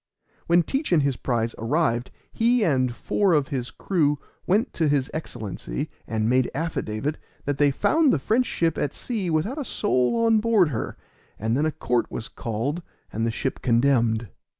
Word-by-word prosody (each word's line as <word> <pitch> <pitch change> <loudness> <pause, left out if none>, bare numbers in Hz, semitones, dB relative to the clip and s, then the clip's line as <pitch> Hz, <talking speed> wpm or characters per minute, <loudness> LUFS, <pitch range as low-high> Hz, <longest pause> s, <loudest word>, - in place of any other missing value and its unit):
When 170 +1 +5
Teach 275 - -2
and 160 -5 +4
his 140 -2 +1
prize 115 -3 -1
arrived 120 0 +1 0.2
he 235 +1 +2
and 130 -8 +2
four 195 +5 +1
of 145 -4 +2
his 125 -3 -2
crew 150 - +1 0.3
went 210 +8 +2
to 160 - +1
his 140 -2 +1
Excellency 105 - -5 0.2
and 110 -1 0
made 125 +1 +3
affidavit 150 -3 -2 0.3
that 145 -1 -1
they 145 -1 +5
found 300 - +3
the - - +3
French 225 - +1
ship 165 -2 0
at 145 - -1
sea 215 -7 -3
without 170 - 0
a - - -2
soul 210 - +1
on 225 -1 +5
board 215 -6 +3
her; 120 -6 -4 0.4
and 110 +2 0
then 150 +4 +2
a - - 0
court 120 -4 -1
was 115 - -6
called, 120 +9 -3 0.3
and 115 +2 0
the - - 0
ship 130 +4 -3
condemned. 115 -3 +2
145 Hz, 175 wpm, -25 LUFS, 120-180 Hz, 0.4 s, When